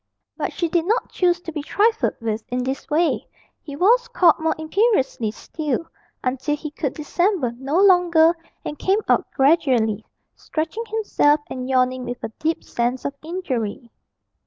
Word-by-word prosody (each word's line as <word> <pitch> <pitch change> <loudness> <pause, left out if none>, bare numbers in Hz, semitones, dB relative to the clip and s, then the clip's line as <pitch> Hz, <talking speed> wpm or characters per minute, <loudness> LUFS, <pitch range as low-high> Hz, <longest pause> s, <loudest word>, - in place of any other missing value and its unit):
But - - -3
she 340 - -1
did 330 0 0
not 450 +4 0
choose 355 -1 +1
to 330 - -7
be 305 -2 -4
trifled 440 +9 +1
with 220 -1 -3
in 250 0 -1
this 265 +2 -4
way: 320 +3 +1 0.3
he 285 -3 -8
was 465 +9 +4
called 360 -8 +4
more 320 0 0
imperiously 315 - +1
still, 295 +7 -3 0.4
until 265 +3 -1
he 295 0 -7
could 290 -3 -3
dissemble 345 - 0
no 280 +6 0
longer 350 -4 +5 0.3
and 295 - -5
came 395 +3 +2
out - - +2
gradually, 255 -7 +3 0.3
stretching 325 +9 -4
himself 405 -9 +2
and 255 0 -5
yawning 255 -1 +1
with 245 0 -6
a - - -3
deep 320 +1 -1
sense 240 +2 -2
of 280 - -2
injury. 255 - -4
310 Hz, 160 wpm, -22 LUFS, 255-355 Hz, 0.4 s, longer